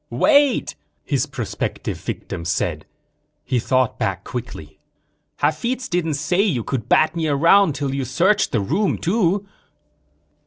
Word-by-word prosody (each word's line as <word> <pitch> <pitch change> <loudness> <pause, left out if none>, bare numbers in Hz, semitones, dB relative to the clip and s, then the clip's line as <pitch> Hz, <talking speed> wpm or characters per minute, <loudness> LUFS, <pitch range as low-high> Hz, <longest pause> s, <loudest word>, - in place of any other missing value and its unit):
"Wait," 285 -3 +3 0.3
his - - -1
prospective - - -4
victim 85 - -6
said. 85 - -2 0.6
He 125 - 0
thought 130 +1 0
back 95 -1 -2
quickly. 80 -11 -7 0.6
"Hafitz 245 - -1
didn't 170 -4 -1
say 175 +6 +1
you 160 - 0
could 120 -2 -4
bat 155 +2 +3
me 165 -2 -1
around 160 +3 +4
till 140 -1 -2
you 135 -1 -2
searched 185 +11 +2
the 115 - +1
room, 180 - 0
too." 195 +1 0
155 Hz, 130 wpm, -21 LUFS, 130-195 Hz, 0.6 s, around